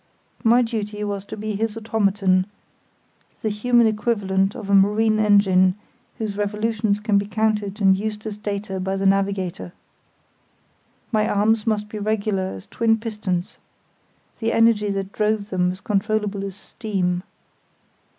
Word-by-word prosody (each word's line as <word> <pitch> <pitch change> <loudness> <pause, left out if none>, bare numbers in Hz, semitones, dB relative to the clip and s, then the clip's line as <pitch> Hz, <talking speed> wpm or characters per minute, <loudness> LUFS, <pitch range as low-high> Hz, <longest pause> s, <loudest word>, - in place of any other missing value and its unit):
My 235 +2 +5
duty 210 -2 -3
was 200 -1 -3
to - - -8
be 215 0 -3
his 220 +2 -2
automaton, 200 -4 +1 1.0
the 220 - +1
human 235 +3 +3
equivalent 205 -3 0
of 215 - -7
a 200 - 0
marine 215 +2 +4
engine 195 -3 +4 0.4
whose 210 -3 -4
revolutions 210 0 0
can 210 -1 +2
be 200 - -4
counted 210 -1 -1
and 195 -2 +5
used 210 +2 -4
as 215 -2 -4
data 200 -2 -4
by 190 +1 -2
the 195 0 -2
navigator. 195 -2 0 1.4
My 215 -2 +2
arms 215 +2 +2
must 210 -1 0
be 210 0 -6
regular 205 -2 -1
as 95 - -10
twin 225 -1 +1
pistons; 210 -5 -3 0.8
the 225 0 0
energy 225 -2 +3
that 195 -1 -3
drove 210 0 -1
them 180 -1 +1
as 185 +2 -9
controllable 210 -1 -1
as 195 -2 -6
steam. 190 -4 -2
210 Hz, 140 wpm, -22 LUFS, 195-220 Hz, 1.4 s, My